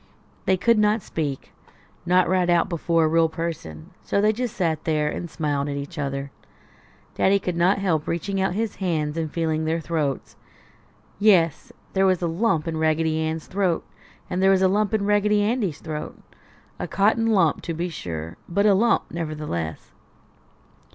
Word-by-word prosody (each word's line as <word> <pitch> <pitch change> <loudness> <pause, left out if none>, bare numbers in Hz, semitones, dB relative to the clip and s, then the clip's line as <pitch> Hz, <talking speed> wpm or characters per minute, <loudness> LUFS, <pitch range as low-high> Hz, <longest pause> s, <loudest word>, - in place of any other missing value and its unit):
They 190 - +3
could 230 +4 +3
not 210 0 +2
speak 145 -4 -4 0.6
not 180 +1 +4
right 180 0 +2
out 175 -1 +3
before 165 -1 +1
a - - +3
real 165 +1 +3
person 160 - -6
so - - -1
they 210 +1 +3
just 240 0 -3
sat 165 -5 0
there 155 -2 +1
and 170 - -5
smiled 145 -3 -2
at 140 - -3
each 145 +3 -6
other. 140 -1 -3 0.8
Daddy 195 +1 +3
could 180 -3 -3
not 175 +3 +3
help 175 -6 0
reaching 190 +4 -2
out 190 -1 0
his 220 0 -2
hands 160 -5 -1
and 160 -2 -3
feeling 160 -1 -1
their 160 +1 0
throats. 155 -4 -2 0.8
Yes! 180 -7 +3 0.2
There 190 0 +3
was 185 -2 +1
a - - +2
lump 165 -2 0
in 160 -1 -2
Raggedy 160 0 +1
Ann's 160 0 -2
throat, 185 -3 -1 0.4
and 180 +1 -2
there 190 - +5
was 190 -1 +4
a - - +6
lump 205 +2 +1
in 200 -2 0
Raggedy 205 0 +3
Andy's 210 - -1
throat. 155 -2 -6 0.6
A - - -3
cotton 220 +3 +2
lump, 185 -9 +3
to 165 - -4
be 170 +2 -2
sure, 85 - -6
but 200 +4 +1
a 205 - +6
lump 230 +4 +3
nevertheless. 150 - -4
170 Hz, 175 wpm, -24 LUFS, 155-195 Hz, 0.8 s, a